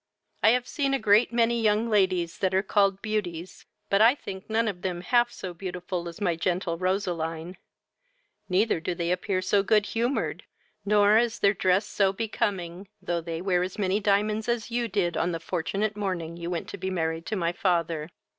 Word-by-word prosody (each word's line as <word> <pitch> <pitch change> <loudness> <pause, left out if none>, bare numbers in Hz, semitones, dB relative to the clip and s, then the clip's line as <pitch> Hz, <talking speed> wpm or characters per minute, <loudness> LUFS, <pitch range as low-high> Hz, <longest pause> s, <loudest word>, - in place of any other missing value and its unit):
I - - +6
have 250 +2 +2
seen 275 -2 0
a - - +2
great 215 +2 +4
many 235 0 +2
young 215 +1 +2
ladies 185 -5 +1
that 190 -1 +1
are 190 - +3
called 195 -1 +2
beauties; 185 -5 -4 0.2
but 200 +1 +2
I 235 +4 +6
think 190 -8 -9
none 225 +1 +1
of 185 -4 -4
them 180 -2 -3
half 240 +5 +2
so 185 -2 -7
beautiful 180 -1 -5
as 170 - -11
my 180 -5 +1
gentle 175 +1 -1
Roseline; 175 -2 -2 0.9
neither 190 0 +2
do 175 +2 -3
they 170 0 -1
appear 185 +1 -1
so 200 +2 +3
good 210 +1 +3
humoured, 240 +5 -1 0.4
nor 205 +1 +5
is 235 -1 0
their 200 0 +3
dress 185 +1 +2
so 200 -2 +1
becoming, 195 -4 -3
though 175 -1 -2
they 165 +1 -5
wear 180 -2 +2
as 180 0 -4
many 195 0 +1
diamonds 210 +2 +1
as 235 -1 -1
you 235 0 0
did 190 -5 0
on 175 +1 0
the 165 - -3
fortunate 195 +5 -2
morning 180 -5 -3
you 170 0 -5
went 175 -2 -3
to - - -7
be 190 +1 -2
married 165 -2 -2
to 215 - -2
my 170 -3 0
father. 170 -5 0
190 Hz, 195 wpm, -27 LUFS, 175-215 Hz, 0.9 s, I